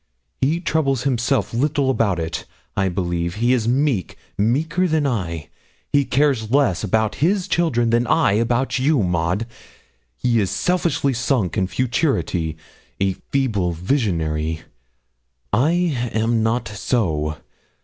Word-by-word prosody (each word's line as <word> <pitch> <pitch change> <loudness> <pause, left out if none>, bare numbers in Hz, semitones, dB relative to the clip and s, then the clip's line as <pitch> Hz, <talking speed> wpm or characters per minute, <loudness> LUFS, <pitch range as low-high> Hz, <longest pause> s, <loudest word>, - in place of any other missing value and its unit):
He 150 +6 +2
troubles 140 -7 0
himself 125 -4 0
little 140 +2 +1
about 110 -8 +1
it, 80 0 -4 0.3
I 95 -1 +1
believe 85 -1 -2
he's 120 +1 +1
meek, 130 - 0 0.2
meeker 150 - +1
than 155 -3 +1
I. 85 - -2 0.4
He 140 -1 +4
cares 130 -6 +1
less 130 -9 +2
about 110 +3 0
his 185 +4 +2
children 120 -9 +1
than 120 +1 +2
I - - +3
about 120 +5 +1
you, 135 -3 +2
Maud; 90 +4 0 0.7
he 120 - +1
is 100 -3 +1
selfishly 165 - 0
sunk 120 -5 0
in 95 -4 +1
futurity 115 - -1 0.4
a 95 -1 +1 0.2
feeble 105 -11 0
visionary. 80 - -1 0.9
I 145 +6 +3 0.4
am 110 +1 +1
not 115 +2 0
so. 90 -8 -1
115 Hz, 125 wpm, -21 LUFS, 95-135 Hz, 0.9 s, He